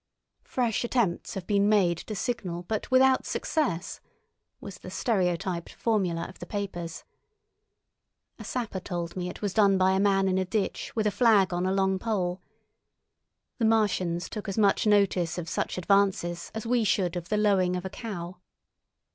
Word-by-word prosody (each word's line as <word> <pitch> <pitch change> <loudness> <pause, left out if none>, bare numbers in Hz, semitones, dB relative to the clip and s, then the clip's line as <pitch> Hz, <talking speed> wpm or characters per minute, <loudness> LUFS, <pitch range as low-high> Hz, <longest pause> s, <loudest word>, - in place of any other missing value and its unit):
"Fresh 240 -3 0
attempts 235 -7 -1
have 190 -2 -5
been 200 +1 +2
made 190 -5 +3
to 215 - -6
signal, 190 -7 -3
but 215 +4 -3
without 260 0 +4
success," 215 - -2 0.6
was 200 -2 -9
the - - -9
stereotyped 180 -4 -1
formula 185 -7 0
of 190 - -14
the - - -8
papers. 185 -5 -5 1.4
A - - -7
sapper 230 -6 -3
told 175 -2 -5
me 180 -1 -3
it 180 - -9
was 200 -2 -1
done 200 -3 +4
by 185 0 +4
a 190 - +2
man 195 -1 +3
in 190 0 +1
a - - +1
ditch 195 +2 -2
with 220 -2 0
a 210 - +2
flag 205 -5 +4
on 175 +1 0
a - - +1
long 190 0 +1
pole. 185 -4 -1 1.2
The 230 - +2
Martians 185 -6 +1
took 210 -2 -6
as 195 - -4
much 205 0 +3
notice 195 -5 +2
of 175 -2 -4
such 170 - -2
advances 180 -2 +1
as 220 - -4
we 240 0 +2
should 185 -3 +1
of 175 0 -5
the 210 - +1
lowing 195 -4 +2
of 180 +1 -4
a - - -3
cow. 180 -6 -6
195 Hz, 170 wpm, -27 LUFS, 180-215 Hz, 1.4 s, without